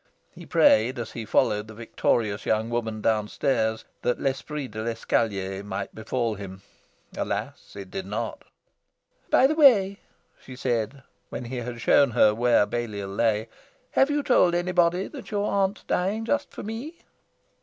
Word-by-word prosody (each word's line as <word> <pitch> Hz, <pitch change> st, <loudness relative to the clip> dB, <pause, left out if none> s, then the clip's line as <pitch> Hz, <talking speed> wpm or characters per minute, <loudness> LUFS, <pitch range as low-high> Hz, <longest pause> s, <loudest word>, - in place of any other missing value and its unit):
He -, -, -12 dB
prayed, 120 Hz, +5 st, +4 dB
as 120 Hz, -2 st, -5 dB
he 115 Hz, -, -6 dB
followed 105 Hz, 0 st, +1 dB
the 110 Hz, -, -11 dB
victorious 110 Hz, -2 st, -1 dB
young 110 Hz, +1 st, +1 dB
woman 110 Hz, -2 st, -2 dB
downstairs, 110 Hz, +1 st, 0 dB, 0.2 s
that 125 Hz, -, 0 dB
l'esprit 140 Hz, +1 st, -3 dB
de 110 Hz, +1 st, -6 dB
l'escalier 105 Hz, -4 st, -1 dB
might 100 Hz, -1 st, -5 dB
befall 115 Hz, +1 st, -2 dB
him. 95 Hz, -1 st, -9 dB, 0.5 s
Alas, -, -, -4 dB
it 100 Hz, -2 st, -9 dB
did 190 Hz, -, -5 dB
not. -, -, -4 dB, 0.9 s
"By -, -, +5 dB
the 285 Hz, -, +3 dB
way," 215 Hz, -11 st, +5 dB, 0.4 s
she 130 Hz, -, -11 dB
said, 125 Hz, 0 st, -2 dB, 0.3 s
when 125 Hz, -, -6 dB
he 125 Hz, +2 st, -5 dB
had 120 Hz, -1 st, -5 dB
shown 140 Hz, +5 st, +5 dB
her 110 Hz, -3 st, +4 dB
where 120 Hz, -1 st, +3 dB
Balliol 105 Hz, -3 st, -4 dB
lay, 110 Hz, +1 st, +1 dB, 0.4 s
"have 270 Hz, -, +3 dB
you 290 Hz, 0 st, 0 dB
told 180 Hz, -11 st, +4 dB
anybody 175 Hz, +1 st, +2 dB
that 280 Hz, -, -10 dB
you 205 Hz, -2 st, -1 dB
aren't 200 Hz, -1 st, 0 dB
dying 205 Hz, +5 st, -1 dB
just 285 Hz, +5 st, 0 dB
for -, -, -9 dB
me?" 240 Hz, +10 st, -7 dB
120 Hz, 155 wpm, -25 LUFS, 110-180 Hz, 0.9 s, By